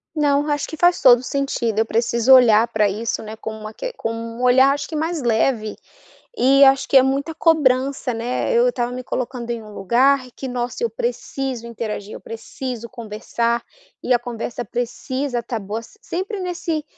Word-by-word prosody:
Não, 290 -1 +2
acho 290 -1 -1
que 315 - -8
faz 350 +2 +3
todo 245 -2 +7
o - - -10
sentido, 245 -5 -1
eu 220 - +3
preciso 235 +3 +3
olhar 235 -3 +6
pra 215 -3 +2
isso, 220 +4 -3
né, 215 0 -8
com 220 - -6
uma 215 0 -8
que - - -6
com 225 - -4
um 230 +1 -6
olhar, 260 +2 +5
acho 285 0 -4
que 315 - -6
mais 320 +1 -2
leve, 225 -2 0 0.6
e 275 0 +5
acho 270 0 +4
que 270 - +6
é 255 - +7
muita 275 +4 -1
cobrança, 275 -5 +2
né, 240 - -2
eu 480 +1 +4
estava 240 - -2
me 255 0 -6
colocando 250 -1 -4
em 235 -1 -4
um 215 - -12
lugar 255 +7 +2
em - - -17
que, 265 - -6
nossa, 245 - -3
eu 470 - +1
preciso 270 - -4
interagir, 215 -3 -5
eu - - -8
preciso 235 +1 -7
conversar, 235 +1 -2 0.4
e - - -3
a - - +5
conversa 240 0 -5
precisa 245 +2 -3
tá 230 -1 -4
boa 210 +3 -5 0.2
sempre, 390 +1 -4
nesse 345 -4 -3
250 Hz, 190 wpm, -21 LUFS, 230-280 Hz, 0.6 s, todo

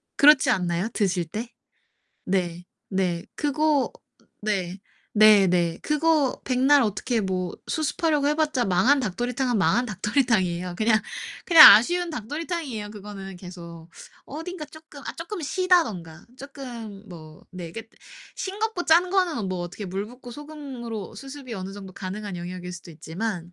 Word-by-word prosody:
그렇지 280 -2 +6
않나요? 180 -2 0
드실 185 -4 0
때? 220 +9 -6 0.8
네. 175 -2 -1 0.2
네. 180 -3 -1
그거 295 -1 +1 0.5
네. 190 -3 -2 0.3
네네. 190 -6 +5
그거 300 -3 +1
백날 265 +3 +4
어떻게 225 +2 -1
뭐 185 -3 -2
수습하려고 305 -1 0
해 300 - +2
봤자 300 -6 +1
망한 240 +10 +3
닭도리탕은 245 +2 -1
망한 195 +7 +2
닭도리탕이에요. 190 -5 0
그냥 220 0 +3 0.4
그냥 330 -3 +11
아쉬운 350 +11 +3
닭도리탕이에요, 290 - -4
그거는 200 -2 -9
계속. 170 -2 -11 0.4
어딘가 325 +3 -7
쪼끔 315 -2 -14
아 - - -4
쪼끔 345 +4 -6
시다든가 255 - 0
쪼끔 235 -7 -9
뭐 155 -3 -12
네, 175 -3 -8
그게 225 +2 -8 0.5
싱겁고 400 -1 -3
짠 345 +3 +4
거는 365 -5 +1
어 - - -3
뭐 185 -2 -3
어떻게 175 +4 -6
물 195 +2 -4
붓고 245 +2 -12
소금으로 260 -7 -7
수습이 270 -3 -8
어느 190 -1 -6
정도 195 -2 -10
가능한 195 +1 -6
영역일 180 +1 -7
수도 175 -1 -10
있지만 175 +3 -5
220 Hz, 310 characters per minute, -25 LUFS, 185-290 Hz, 0.8 s, 그냥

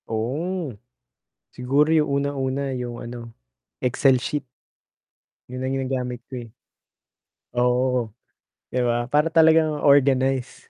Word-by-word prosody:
Oh. 145 +8 -3 0.8
Siguro 135 +5 +2
'yong 150 -3 +2
unang-una 140 -1 -2
'yong 120 -1 -5
ano, 120 -1 -8 0.5
Excel 130 0 +3
sheet. 145 0 -3 1.0
'Yon 125 +1 -5
ang 130 - -1
ginagamit 130 -2 -3
ko, 130 - -7
eh. 115 - -17 1.0
Oh, 125 0 +2
oo. 125 0 +1 0.7
'Di 125 - -2
ba? 120 +1 0
Para 150 +2 +3
talagang 160 -2 +4
organized. 135 -2 +2
130 Hz, 110 wpm, -23 LUFS, 125-145 Hz, 1.0 s, talagang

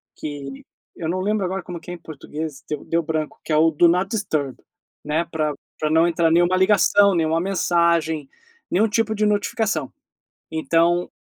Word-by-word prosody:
que 140 -2 -7 0.3
eu 160 - -5
não 185 +1 -1
lembro 205 -1 0
agora 190 0 -3
como 175 -2 -7
que 170 - -13
é - - -4
em - - -7
português 155 -2 -7
deu 150 -2 -4
deu 170 0 +1
branco, 155 -1 -3
que - - -6
é - - +4
o 160 +1 +4
do 170 +3 +4
not 180 +3 +2
disturb, 155 - -2 0.5
né, 155 +3 0
pra 155 -2 -1 0.3
pra 155 - 0
não 160 +2 +4
entrar 165 -1 +2
nenhuma 175 +2 +3
ligação, 200 0 +4
nenhuma 165 0 +1
mensagem, 170 -5 +1 0.4
nenhum 215 +5 +3
tipo 220 0 0
de 210 +1 +1
notificação 210 +1 0 0.6
então, 170 +2 +1
170 Hz, 175 wpm, -22 LUFS, 155-190 Hz, 0.6 s, é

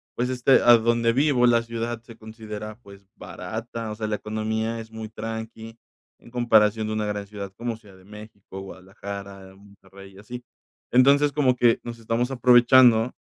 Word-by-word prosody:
pues, 125 +1 -1
este, 130 +1 +3
a 120 -1 +7
donde 115 0 +1
vivo, 130 -1 +2
la 115 -1 +3
ciudad 115 0 -5
se 115 -1 -14
considera, 110 0 -9
pues, 100 -2 -17
barata, 110 +4 -7
o 105 - -6
sea, 110 -1 -4
la 105 - -1
economía 110 +2 -3
es 110 0 -10
muy 110 -1 -8
tranqui 110 0 -8 0.4
en 120 - -18
comparación 110 -3 +2
de 110 - -3
una 110 -1 -2
gran 105 -1 -4
ciudad 100 -2 -8
como 120 -1 -4
Ciudad 105 -4 -18
de 95 - -20
México, 105 -2 -12
Guadalajara, 95 0 -10
Monterrey, 100 -1 -17
y - - -17
así. 120 +4 -10 0.5
Entonces, 140 +3 +4
como 130 -4 +1
que 120 -2 +3
nos 120 -1 -8
estamos 115 +3 -2
aprovechando 120 -1 +5
110 Hz, 170 wpm, -24 LUFS, 105-120 Hz, 0.5 s, a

